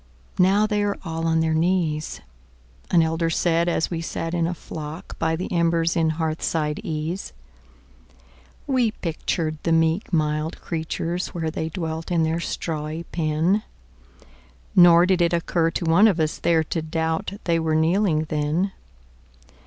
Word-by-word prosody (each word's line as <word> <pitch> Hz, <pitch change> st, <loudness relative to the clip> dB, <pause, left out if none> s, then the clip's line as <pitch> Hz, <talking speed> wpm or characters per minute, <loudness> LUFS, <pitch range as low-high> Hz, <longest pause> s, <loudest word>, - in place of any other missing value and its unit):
"Now 195 Hz, +4 st, +4 dB
they 210 Hz, -1 st, 0 dB
are 205 Hz, -1 st, 0 dB
all 165 Hz, 0 st, -2 dB
on 160 Hz, 0 st, +2 dB
their 160 Hz, 0 st, +1 dB
knees,"An 75 Hz, -, -2 dB
elder 165 Hz, +1 st, 0 dB
said 170 Hz, +1 st, +1 dB
as 170 Hz, -, 0 dB
we 165 Hz, -1 st, -2 dB
sat 165 Hz, 0 st, -4 dB
in 170 Hz, -1 st, +1 dB
a 175 Hz, -, -3 dB
flock 155 Hz, +2 st, -8 dB
By 160 Hz, 0 st, +1 dB
the 180 Hz, -, -5 dB
embers 170 Hz, -1 st, +2 dB
in 160 Hz, -2 st, +2 dB
hearthside 155 Hz, -1 st, -1 dB
ease. 160 Hz, -, -4 dB, 1.3 s
We 255 Hz, -4 st, +2 dB
pictured 160 Hz, -4 st, -3 dB
the 165 Hz, -, -1 dB
meek 165 Hz, +4 st, +2 dB
mild 155 Hz, -1 st, 0 dB
creatures 170 Hz, +2 st, -3 dB
where 160 Hz, -2 st, -2 dB
They 160 Hz, 0 st, -3 dB
dwelt 160 Hz, 0 st, -4 dB
in 170 Hz, -2 st, +2 dB
their 160 Hz, +1 st, 0 dB
strawy 160 Hz, -1 st, -4 dB
pen, 165 Hz, +5 st, +1 dB, 1.1 s
Nor 175 Hz, -1 st, +8 dB
did 185 Hz, -1 st, +2 dB
it 170 Hz, 0 st, +2 dB
occur 170 Hz, 0 st, +1 dB
to 170 Hz, +1 st, -3 dB
one 170 Hz, +7 st, +6 dB
of 190 Hz, -6 st, +1 dB
us 155 Hz, -1 st, 0 dB
there 165 Hz, -2 st, +2 dB
To 160 Hz, +1 st, -3 dB
doubt 160 Hz, +3 st, -2 dB
they 170 Hz, -1 st, +1 dB
were 160 Hz, -1 st, 0 dB
kneeling 160 Hz, 0 st, +2 dB
then. 155 Hz, +5 st, -1 dB
165 Hz, 150 wpm, -23 LUFS, 160-175 Hz, 1.3 s, Nor